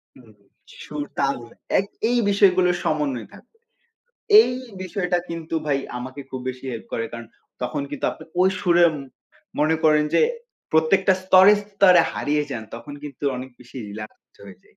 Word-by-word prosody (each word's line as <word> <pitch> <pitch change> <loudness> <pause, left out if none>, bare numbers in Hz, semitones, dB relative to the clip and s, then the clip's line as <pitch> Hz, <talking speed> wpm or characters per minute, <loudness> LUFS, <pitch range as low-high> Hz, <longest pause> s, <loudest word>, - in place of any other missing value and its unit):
হুম 125 -3 -18 0.5
সুর 150 -1 -5 0.2
তাল 140 0 +1 0.4
এক 195 - -1 0.2
এই 245 - +2
বিষয়গুলো 185 -3 +4
সমন্বয় 140 -7 -1
থাকবে। 350 - -18 0.8
এই 440 - +2 0.3
বিষয়টা 180 -1 -1
কিন্তু 165 -1 -6
ভাই 140 -2 +1 0.2
আমাকে 130 +3 -7
খুব 130 - -5
বেশি 130 +1 -7
হেল্প 115 - -7
করে। 115 - -1
কারণ 115 0 -7 0.4
তখন 140 +3 -2
কিন্তু 145 - -5
আপনি - - -11 0.2
ওই 190 +1 +5
সুরে 175 -3 +4
ম - - -6 0.6
মনে 155 +2 +3
করেন 150 -1 +5
যে - - +5 0.5
প্রত্যেকটা 185 +5 +4
স্তরে, 190 +2 +7 0.2
স্তরে 190 -3 +6
হারিয়ে 150 +1 0
যান 120 -4 -5
তখন 130 +5 -9
কিন্তু 145 -1 -8
অনেক 130 +1 -7
বেশি 125 +1 -14
রিল্যাক্স 110 +1 -11
হয়ে 100 -2 -13
যায়। - - -28
150 Hz, 160 wpm, -23 LUFS, 130-180 Hz, 0.8 s, স্তরে